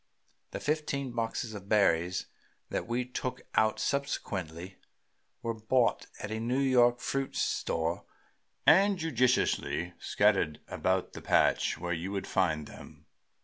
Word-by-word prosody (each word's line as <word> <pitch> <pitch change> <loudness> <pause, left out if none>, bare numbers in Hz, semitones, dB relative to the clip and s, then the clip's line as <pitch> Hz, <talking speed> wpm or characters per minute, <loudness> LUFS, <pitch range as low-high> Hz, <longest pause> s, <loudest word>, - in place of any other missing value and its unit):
The - - -5
fifteen 145 -3 -1
boxes 115 -1 -3
of 100 -1 -9
berries 90 -4 +2 0.5
that - - -2
we 120 +1 -1
took 125 0 -4
out 110 0 +2
subsequently 95 - -3 0.7
were 115 - -1
bought 115 +2 +1
at 100 - -5
a 110 - -2
New 120 +3 -1
York 125 -3 +4
fruit 135 +1 -2
store 80 +1 -1 0.6
and 195 +3 +6
judiciously 125 - +1
scattered 75 -1 +2
about 95 0 -1
the - - -8
patch - - +2
where 90 +1 -2
you 85 +3 -4
would 100 -1 -3
find 80 -5 0
them. - - -13
110 Hz, 130 wpm, -30 LUFS, 90-130 Hz, 0.7 s, and